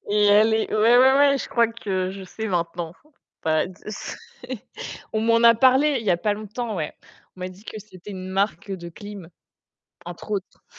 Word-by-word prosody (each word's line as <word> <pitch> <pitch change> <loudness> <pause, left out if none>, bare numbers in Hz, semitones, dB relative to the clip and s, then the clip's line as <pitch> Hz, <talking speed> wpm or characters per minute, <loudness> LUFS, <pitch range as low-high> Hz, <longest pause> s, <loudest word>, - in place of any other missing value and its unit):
Et 210 0 +3
elle 210 +2 +6
est 220 - 0
ouais, 230 +3 +5
ouais, 265 +1 +6
ouais, 280 -1 +5
je - - -5
crois 235 -1 +3
que 190 -5 -2
je 195 0 -8
sais 220 +4 -6
maintenant. 170 -2 -2 0.5
Bah 155 -1 +2
de 185 - -11
sais. 210 - -6 1.0
On 220 - 0
m'en 230 +1 +3
a 230 0 +8
parlé 265 +4 +4
il - - -9
y 210 - +2
a 175 - +4
pas 205 +4 0
longtemps, 215 +1 -5
ouais. 155 -3 -3 0.4
On - - -13
m'a 185 - -3
dit 185 +3 -15
que 215 - -7
c'était 200 -1 -12
une 185 -1 -6
marque 195 +2 -1
de 175 -2 -6
clim, 200 0 -10 0.8
entre 175 +4 -9
autres. 195 -2 -5
210 Hz, 200 wpm, -24 LUFS, 185-230 Hz, 1.0 s, a